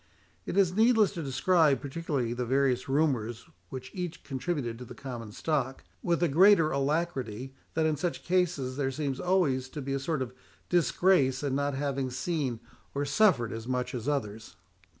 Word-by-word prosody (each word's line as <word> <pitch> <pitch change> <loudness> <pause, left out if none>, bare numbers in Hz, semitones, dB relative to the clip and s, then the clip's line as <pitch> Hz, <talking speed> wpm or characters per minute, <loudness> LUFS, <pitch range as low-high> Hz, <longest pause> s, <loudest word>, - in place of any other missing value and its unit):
It - - -2
is 185 -3 +4
needless 220 0 +4
to 175 - -5
describe 150 +2 +3
particularly 140 -5 -2
the 125 +1 -2
various 130 +1 +1
rumours 125 -6 0 0.2
which 130 -1 -7
each 180 -3 -5
contributed 130 -4 -3
to 125 - -7
the - - -10
common 120 -5 -7
stock, 135 +1 -2 0.2
with 170 -1 0
the 175 - +4
greater 165 +1 +5
alacrity 135 -4 -1 0.2
that 160 0 +2
in 155 -1 +2
such 170 +4 -3
cases 170 -8 0
there 135 -2 0
seems 135 -1 -3
always 170 -9 +1
to 150 - -7
be 135 0 -3
a 135 - 0
sort 140 0 -1
of 125 -1 -8 0.4
disgrace 170 -6 +3
in 140 -2 -1
not 140 0 0
having 135 -1 -1
seen 130 -3 -2 0.3
or 140 +1 0
suffered 160 - +3
as 115 +1 -6
much 125 -1 -2
as 125 +2 -3
others. 110 -7 -3
140 Hz, 170 wpm, -29 LUFS, 130-165 Hz, 0.4 s, greater